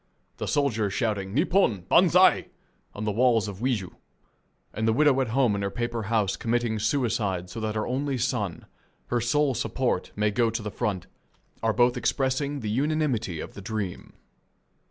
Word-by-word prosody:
The -, -, -4 dB
soldier 115 Hz, -8 st, +1 dB
shouting 100 Hz, -2 st, -2 dB
"Nippon, 150 Hz, -, +2 dB
Banzai!" 180 Hz, -, +4 dB, 0.5 s
on 105 Hz, -, -5 dB
the 105 Hz, -, 0 dB
walls 115 Hz, -1 st, +3 dB
of 100 Hz, -2 st, -7 dB
Wiju, 115 Hz, -7 st, -1 dB, 0.8 s
the 110 Hz, 0 st, +1 dB
widow 140 Hz, +1 st, +4 dB
at 130 Hz, -, 0 dB
home 120 Hz, -1 st, +2 dB
in 100 Hz, -, -2 dB
her 100 Hz, -, -1 dB
paper 120 Hz, +2 st, -3 dB
house 105 Hz, -4 st, +1 dB
committing 115 Hz, -1 st, -1 dB
suicide 105 Hz, -6 st, -1 dB
so 115 Hz, -, -6 dB
that 110 Hz, -1 st, -3 dB
her 110 Hz, -, -1 dB
only 135 Hz, +2 st, -1 dB
son, 110 Hz, -7 st, -2 dB, 0.4 s
her 120 Hz, -1 st, +1 dB
sole 140 Hz, +4 st, +2 dB
support, 125 Hz, -4 st, -1 dB
may 105 Hz, 0 st, +1 dB
go 115 Hz, +2 st, +2 dB
to 110 Hz, 0 st, -4 dB
the 105 Hz, -, -4 dB
front, 105 Hz, -6 st, -2 dB, 0.6 s
are 115 Hz, -, +2 dB
both 120 Hz, +2 st, +3 dB
expressing 135 Hz, +3 st, -1 dB
the 110 Hz, -, -3 dB
unanimity 130 Hz, -, 0 dB
of -, -, -7 dB
the 100 Hz, -, -9 dB
dream. 100 Hz, -3 st, -5 dB
115 Hz, 165 wpm, -26 LUFS, 105-130 Hz, 0.8 s, Banzai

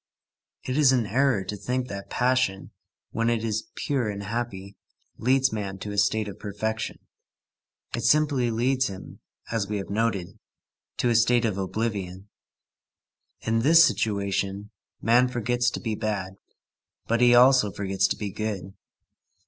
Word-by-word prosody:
It 130 Hz, +3 st, -2 dB
is 140 Hz, -3 st, +6 dB
an 125 Hz, -4 st, +2 dB
error 125 Hz, -1 st, +1 dB
to 95 Hz, +3 st, -5 dB
think 125 Hz, +5 st, -2 dB
that 100 Hz, -3 st, -7 dB
passion, 125 Hz, -6 st, 0 dB, 0.4 s
when 115 Hz, +1 st, 0 dB
it 115 Hz, -1 st, 0 dB
is 110 Hz, -1 st, -2 dB
pure 130 Hz, -6 st, -1 dB
and 100 Hz, -1 st, -5 dB
happy, 100 Hz, -3 st, -5 dB, 0.4 s
leads 130 Hz, +2 st, +2 dB
man 100 Hz, -3 st, -4 dB
to 105 Hz, +2 st, -6 dB
a 105 Hz, -, -5 dB
state 110 Hz, +1 st, +1 dB
of 100 Hz, 0 st, -8 dB
perfection; 110 Hz, +2 st, -3 dB, 1.0 s
it 120 Hz, -, -2 dB
simply 135 Hz, 0 st, +2 dB
leads 125 Hz, +3 st, +1 dB
him, 95 Hz, -1 st, -9 dB, 0.3 s
as 115 Hz, -3 st, -1 dB
we 105 Hz, +1 st, -2 dB
have 100 Hz, 0 st, -6 dB
noted, 100 Hz, -4 st, -1 dB, 0.6 s
to 120 Hz, -, +1 dB
a 120 Hz, -, +2 dB
state 120 Hz, +1 st, +3 dB
of 100 Hz, -4 st, -1 dB
oblivion. 95 Hz, -1 st, -3 dB, 1.1 s
In 115 Hz, 0 st, 0 dB
this 165 Hz, +7 st, +7 dB
situation, 100 Hz, -1 st, -1 dB, 0.3 s
man 120 Hz, +3 st, +4 dB
forgets 120 Hz, 0 st, 0 dB
to -, -, -5 dB
be 115 Hz, -3 st, -3 dB
bad, 105 Hz, -4 st, -3 dB, 0.7 s
but 115 Hz, +1 st, 0 dB
he 120 Hz, 0 st, +6 dB
also 125 Hz, -4 st, +6 dB
forgets 95 Hz, -1 st, 0 dB
to -, -, -1 dB
be 105 Hz, -2 st, -4 dB
good. 95 Hz, -3 st, -4 dB
110 Hz, 150 wpm, -25 LUFS, 100-125 Hz, 1.1 s, this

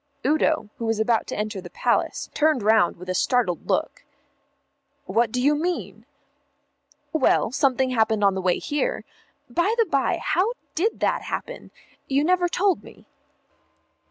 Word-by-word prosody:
Udo, 300 Hz, -6 st, +1 dB
who 230 Hz, -, -3 dB
was 225 Hz, -1 st, 0 dB
about 225 Hz, 0 st, +1 dB
to -, -, -5 dB
enter 210 Hz, -2 st, -3 dB
the 175 Hz, -, -10 dB
Palace, -, -, -1 dB
turned 305 Hz, -6 st, +2 dB
round 215 Hz, -3 st, +3 dB
with 180 Hz, +1 st, -11 dB
a 185 Hz, -, -1 dB
startled 185 Hz, -3 st, 0 dB
look. -, -, -1 dB, 1.0 s
"What 225 Hz, +3 st, +1 dB
do 250 Hz, -, -1 dB
you 285 Hz, +4 st, +3 dB
mean?" 345 Hz, +4 st, -3 dB, 1.1 s
"Well, 315 Hz, -7 st, +2 dB
something 260 Hz, -1 st, +1 dB
happened 220 Hz, -3 st, +1 dB
on 200 Hz, -1 st, +4 dB
the 190 Hz, -, -3 dB
way 180 Hz, -1 st, +1 dB
here. 305 Hz, +12 st, -2 dB, 0.4 s
By 345 Hz, -, +1 dB
the 460 Hz, -, +4 dB
by, 275 Hz, -7 st, 0 dB
how 405 Hz, +7 st, 0 dB, 0.2 s
did 420 Hz, +8 st, -1 dB
that -, -, +1 dB
happen? -, -, -6 dB, 0.4 s
You 275 Hz, +1 st, +1 dB
never 355 Hz, +1 st, +2 dB
told 385 Hz, +1 st, +1 dB
me." -, -, -15 dB
255 Hz, 155 wpm, -24 LUFS, 215-315 Hz, 1.1 s, on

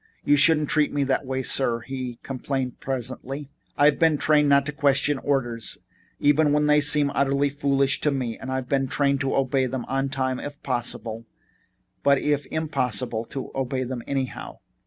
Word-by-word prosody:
"You 145 Hz, -, +5 dB
shouldn't 150 Hz, +1 st, +4 dB
treat 150 Hz, 0 st, +2 dB
me 145 Hz, -1 st, 0 dB
that 135 Hz, 0 st, -1 dB
way, 130 Hz, 0 st, -2 dB
sir," 120 Hz, -3 st, +1 dB
he 130 Hz, -1 st, -6 dB
complained 130 Hz, -1 st, -4 dB
presently. 135 Hz, +2 st, -5 dB, 0.3 s
"I've 145 Hz, 0 st, +4 dB
been 160 Hz, -2 st, +4 dB
trained 150 Hz, 0 st, +3 dB
not 140 Hz, 0 st, +4 dB
to 150 Hz, -, -3 dB
question 145 Hz, -1 st, +1 dB
orders, 120 Hz, -5 st, -2 dB, 0.4 s
even 145 Hz, +1 st, +3 dB
when 150 Hz, 0 st, +2 dB
they 150 Hz, 0 st, +4 dB
seem 145 Hz, -1 st, +4 dB
utterly 140 Hz, +1 st, +1 dB
foolish 140 Hz, -1 st, +1 dB
to 150 Hz, -, +2 dB
me; 130 Hz, -5 st, -3 dB
I've 130 Hz, -1 st, -4 dB
been 135 Hz, 0 st, 0 dB
trained 140 Hz, 0 st, +1 dB
to 135 Hz, -, 0 dB
obey 135 Hz, -1 st, +1 dB
them 125 Hz, 0 st, -4 dB
on 135 Hz, +1 st, -1 dB
time, 130 Hz, -1 st, -1 dB
if 145 Hz, 0 st, -7 dB
possible, 115 Hz, -3 st, -3 dB, 0.7 s
but 140 Hz, 0 st, +4 dB
if 145 Hz, 0 st, -1 dB
impossible, 125 Hz, -7 st, -2 dB
to 135 Hz, +3 st, -6 dB
obey 130 Hz, 0 st, -2 dB
them 125 Hz, -1 st, -5 dB
anyhow. 135 Hz, -2 st, -4 dB
135 Hz, 170 wpm, -24 LUFS, 130-145 Hz, 0.7 s, You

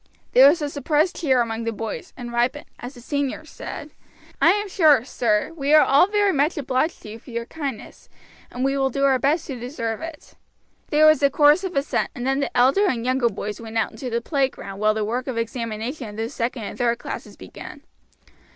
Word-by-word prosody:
There 265 Hz, +2 st, +9 dB
was 315 Hz, +1 st, +1 dB
a 290 Hz, -, -1 dB
suppressed 300 Hz, +4 st, 0 dB
cheer 260 Hz, -6 st, +2 dB
among 230 Hz, -1 st, -3 dB
the 230 Hz, -, -1 dB
boys 225 Hz, 0 st, -6 dB
and 240 Hz, -1 st, -7 dB
Ripon, 245 Hz, +5 st, 0 dB
as 245 Hz, +3 st, -8 dB
the 240 Hz, -, -12 dB
senior, 285 Hz, +3 st, -3 dB
said: -, -, -8 dB, 0.5 s
"I -, -, +6 dB
am 415 Hz, 0 st, +2 dB
sure, 310 Hz, -, +4 dB
sir, 225 Hz, 0 st, 0 dB
we 290 Hz, 0 st, +2 dB
are 305 Hz, -, +8 dB
all 280 Hz, +7 st, +5 dB
very 410 Hz, -1 st, +2 dB
much 300 Hz, +4 st, +1 dB
obliged 275 Hz, +3 st, -1 dB
to -, -, -9 dB
you 220 Hz, +2 st, -9 dB
for 245 Hz, -, -16 dB
your 235 Hz, 0 st, -4 dB
kindness, 275 Hz, -5 st, -7 dB, 0.4 s
and 250 Hz, +2 st, -3 dB
we 275 Hz, 0 st, +1 dB
will 270 Hz, -1 st, +1 dB
do 275 Hz, +2 st, -2 dB
our 270 Hz, -2 st, +4 dB
best 300 Hz, +6 st, +1 dB
to 265 Hz, -5 st, -6 dB
deserve 230 Hz, -3 st, -4 dB
it." 325 Hz, -2 st, -9 dB, 0.6 s
There 305 Hz, +1 st, +4 dB
was 310 Hz, -1 st, +6 dB
a 280 Hz, -, +5 dB
chorus 295 Hz, +5 st, +4 dB
of 375 Hz, -2 st, -4 dB
assent, 275 Hz, +1 st, 0 dB
and 245 Hz, -2 st, -5 dB
then 270 Hz, +1 st, +1 dB
the 280 Hz, -, -2 dB
elder 270 Hz, +12 st, +4 dB
and 235 Hz, -8 st, -1 dB
younger 255 Hz, -1 st, +2 dB
boys 210 Hz, -1 st, -6 dB
went 225 Hz, 0 st, -6 dB
out 225 Hz, -, 0 dB
into 250 Hz, +3 st, -6 dB
the 235 Hz, 0 st, -1 dB
playground 265 Hz, -, -2 dB
while 215 Hz, 0 st, +2 dB
the 215 Hz, -1 st, -1 dB
work 245 Hz, +5 st, -3 dB
of 255 Hz, -3 st, -3 dB
examination 230 Hz, +2 st, -4 dB
of 210 Hz, -, -10 dB
the 225 Hz, +1 st, -2 dB
second 240 Hz, -2 st, -3 dB
and -, -, -7 dB
third 235 Hz, -1 st, +1 dB
classes -, -, -8 dB
began. -, -, -11 dB
260 Hz, 220 wpm, -23 LUFS, 230-295 Hz, 0.6 s, There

